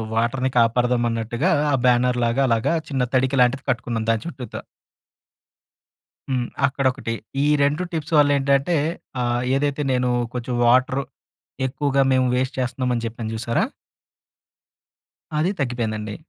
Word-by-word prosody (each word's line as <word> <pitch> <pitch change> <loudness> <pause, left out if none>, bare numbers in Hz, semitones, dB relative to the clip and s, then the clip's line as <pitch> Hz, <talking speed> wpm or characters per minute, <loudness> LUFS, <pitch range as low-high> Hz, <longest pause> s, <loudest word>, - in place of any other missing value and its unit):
వాటర్‌ని 125 +3 +1
కాపాడదాం 120 +1 +3
అన్నట్టుగా 115 +8 -1 0.2
ఆ - - +1
బ్యానర్ 125 0 +3
లాగా 120 +4 +1
అలాగా 115 +5 +1 0.2
చిన్న 135 -3 0
తడిక 130 +1 +2
లాంటిది 125 +2 +2
కట్టుకున్నాం 115 -3 -1
దాని 115 -1 +1
చుట్టూత. 130 -8 -7 1.7
హ్మ్. 125 -2 0 0.2
అక్కడొకటి. 130 -3 -1 0.3
ఈ - - +2 0.2
2 145 +5 +1
టిప్స్ 160 -1 -4
వల్ల 145 -1 +5
ఏంటంటే 140 +4 +2 0.4
ఆహ్, 120 0 0
ఏదైతే 145 +1 0
నేను 125 -1 +1 0.2
కొంచెం 125 0 -4
వాటర్ 130 +2 +3 0.7
ఎక్కువగా 140 +1 0
మేము 130 -1 +3
వేస్ట్ 130 +1 -1
చేస్తున్నామని 125 -1 -1
చెప్పాను 115 -1 -5
చూసారా? 115 +1 0 1.7
అది 165 +5 +2
తగ్గిపోయిందండి. 110 -5 -2
125 Hz, 120 wpm, -22 LUFS, 120-135 Hz, 1.7 s, వల్ల